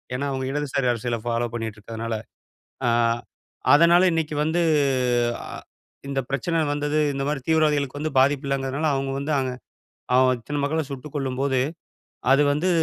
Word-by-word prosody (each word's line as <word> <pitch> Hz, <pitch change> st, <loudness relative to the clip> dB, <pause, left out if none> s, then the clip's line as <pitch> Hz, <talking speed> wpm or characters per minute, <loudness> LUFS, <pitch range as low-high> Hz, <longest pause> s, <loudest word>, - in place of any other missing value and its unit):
ஏனா 140 Hz, +3 st, -2 dB
அவங்க 130 Hz, -1 st, -2 dB
இடதுசாரி 140 Hz, -2 st, -1 dB
அரசியல 120 Hz, 0 st, -2 dB
ஃபாலோ 120 Hz, 0 st, 0 dB
பண்ணிருக்கதுனால. 115 Hz, 0 st, -5 dB, 0.7 s
அ -, -, +4 dB, 0.8 s
அதனால 170 Hz, +4 st, +6 dB
இன்னிக்கு 160 Hz, -2 st, -1 dB
வந்து 160 Hz, +3 st, +1 dB, 0.8 s
அ -, -, -9 dB, 0.6 s
இந்த 140 Hz, -1 st, -1 dB
பிரச்சன 160 Hz, +5 st, 0 dB
வந்தது 150 Hz, +1 st, -1 dB, 0.2 s
இந்த 135 Hz, 0 st, -2 dB
மாரி 150 Hz, -1 st, -1 dB
தீவிரவாதிகளுக்கு 150 Hz, -3 st, +2 dB
வந்து 155 Hz, +1 st, -2 dB
பாதிப்பில்லங்குறதுனால, 135 Hz, +1 st, +1 dB
அவங்க 135 Hz, 0 st, -2 dB
வந்து 140 Hz, +2 st, -3 dB
அங்க 130 Hz, -1 st, -1 dB, 0.6 s
அ -, -, +5 dB, 0.2 s
இத்தன 145 Hz, +5 st, -4 dB
மக்கள 155 Hz, +3 st, 0 dB
சுட்டுக் 135 Hz, +1 st, -8 dB
கொல்லும்போது, 135 Hz, -1 st, 0 dB, 0.7 s
அது 135 Hz, +2 st, +6 dB
வந்து 150 Hz, +6 st, 0 dB
140 Hz, 135 wpm, -24 LUFS, 130-150 Hz, 0.8 s, அதனால